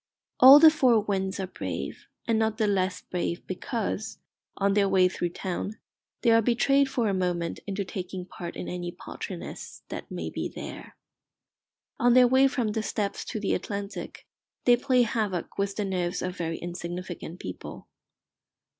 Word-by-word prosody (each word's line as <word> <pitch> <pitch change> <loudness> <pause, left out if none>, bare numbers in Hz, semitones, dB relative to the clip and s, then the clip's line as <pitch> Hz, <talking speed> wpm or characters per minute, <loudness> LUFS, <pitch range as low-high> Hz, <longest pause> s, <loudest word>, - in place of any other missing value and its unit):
All 265 +3 +11
the 315 0 +9
four 255 -7 +4
winds 195 -2 -2
are 190 - -1
brave, 185 - -6 0.2
and 225 -1 +2
not 220 -1 +1
the 220 - +2
less 190 -2 0
brave 175 -1 -3
because, 215 +2 -3 0.4
on 200 0 +2
their 200 -1 +3
way 185 -1 +5
through 175 -1 -2
town, 190 +4 -4 0.5
they 235 - +5
are 230 0 +6
betrayed 275 +4 +3
for 240 -4 0
a 200 - +1
moment 175 -3 -1
into 200 0 -2
taking 185 -1 -5
part 175 -1 -8
in - - -5
any 175 -1 -4
paltriness 175 - -8
that - - -6
may - - -5
be - - -3
there. - - -9 1.0
On 245 0 +4
their 250 -1 +8
way 260 +2 +5
from 250 -5 -1
the 220 +1 -1
Steppes 205 -2 -2
to 220 - -4
the 205 - 0
Atlantic 200 -1 -5 0.4
they 245 - +7
play 250 0 +3
havoc 210 -6 -2
with 200 0 0
the 210 - -1
nerves 180 -2 -2
of 180 0 -3
very 165 -3 -3
insignificant 175 0 -6
people. 90 0 -8
200 Hz, 165 wpm, -27 LUFS, 180-230 Hz, 1.0 s, All